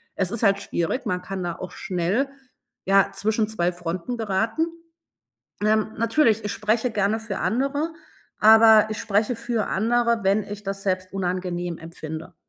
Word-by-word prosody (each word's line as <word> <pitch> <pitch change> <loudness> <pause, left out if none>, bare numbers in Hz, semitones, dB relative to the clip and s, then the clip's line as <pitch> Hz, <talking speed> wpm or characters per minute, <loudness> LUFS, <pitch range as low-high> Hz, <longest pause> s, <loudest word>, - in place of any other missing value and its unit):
Es 190 -1 -1
ist 230 - -4
halt 200 -1 +4
schwierig, 175 +10 -2
man 180 0 -1
kann 190 0 -5
da 175 -1 -2
auch 185 - -6
schnell, 185 +9 -1 0.6
ja, 195 +1 +4
zwischen 215 +1 0
2 180 -5 0
Fronten 175 +7 -4
geraten. 225 +7 0 1.0
Ähm, 215 0 +2
natürlich, 230 -1 +2
ich 205 - -2
spreche 225 +2 0
gerne 210 +1 +1
für 215 -3 -5
andere, 285 +7 -1 0.5
aber 220 0 +7
ich 215 - -4
spreche 210 +4 +1
für 230 -2 -2
andere, 235 +3 +1
wenn 200 +2 +2
ich 205 0 -8
das 195 0 -5
selbst 185 -1 -2
unangenehm 180 -2 -2
empfinde. 165 +1 -8
210 Hz, 155 wpm, -24 LUFS, 185-225 Hz, 1.0 s, aber